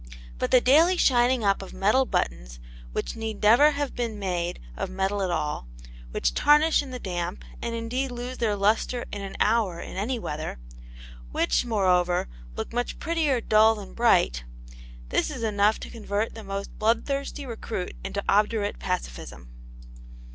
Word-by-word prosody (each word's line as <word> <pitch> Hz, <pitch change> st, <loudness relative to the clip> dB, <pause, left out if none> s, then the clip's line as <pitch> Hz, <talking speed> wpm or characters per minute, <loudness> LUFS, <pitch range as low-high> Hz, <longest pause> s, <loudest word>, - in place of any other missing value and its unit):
But -, -, 0 dB
the 255 Hz, -, +6 dB
daily 325 Hz, +9 st, +5 dB
shining 245 Hz, -4 st, +3 dB
up 195 Hz, -1 st, +2 dB
of 195 Hz, -, -9 dB
metal 235 Hz, +7 st, +3 dB
buttons -, -, -2 dB, 0.3 s
which -, -, -3 dB
need 220 Hz, -2 st, -5 dB
never 235 Hz, +8 st, +7 dB
have 290 Hz, -2 st, -2 dB
been 230 Hz, -3 st, -3 dB
made 175 Hz, -3 st, -2 dB, 0.2 s
of -, -, -3 dB
metal 195 Hz, +2 st, -1 dB
at 190 Hz, -, 0 dB
all, 150 Hz, -, -2 dB, 0.4 s
which -, -, 0 dB
tarnish 300 Hz, -, +4 dB
in 280 Hz, -, -8 dB
the 255 Hz, -, -5 dB
damp 175 Hz, -5 st, -4 dB, 0.2 s
and 235 Hz, 0 st, -3 dB
indeed 245 Hz, +4 st, -2 dB
lose 245 Hz, +1 st, -6 dB
their 220 Hz, -3 st, +1 dB
lustre 215 Hz, +4 st, +1 dB
in 205 Hz, -, -5 dB
an 195 Hz, -1 st, -7 dB
hour 210 Hz, -6 st, +2 dB
in -, -, -7 dB
any 235 Hz, +6 st, -1 dB
weather, 155 Hz, -, -5 dB, 0.7 s
which, -, -, +1 dB
moreover, 180 Hz, -5 st, +2 dB, 0.3 s
look -, -, -5 dB
much 245 Hz, 0 st, -2 dB
prettier 310 Hz, -6 st, 0 dB
dull 220 Hz, 0 st, +5 dB
than 205 Hz, -2 st, -9 dB
bright 180 Hz, -, +3 dB, 0.7 s
this -, -, +1 dB
is 260 Hz, -6 st, -5 dB
enough 210 Hz, 0 st, +2 dB
to -, -, -7 dB
convert 215 Hz, -1 st, -2 dB
the 225 Hz, -, -9 dB
most 195 Hz, 0 st, -6 dB
bloodthirsty 275 Hz, +6 st, 0 dB
recruit 225 Hz, -6 st, -5 dB
into 200 Hz, +1 st, -3 dB
obdurate 210 Hz, 0 st, +1 dB
pacifism. 60 Hz, -, -5 dB
215 Hz, 160 wpm, -26 LUFS, 190-245 Hz, 0.7 s, never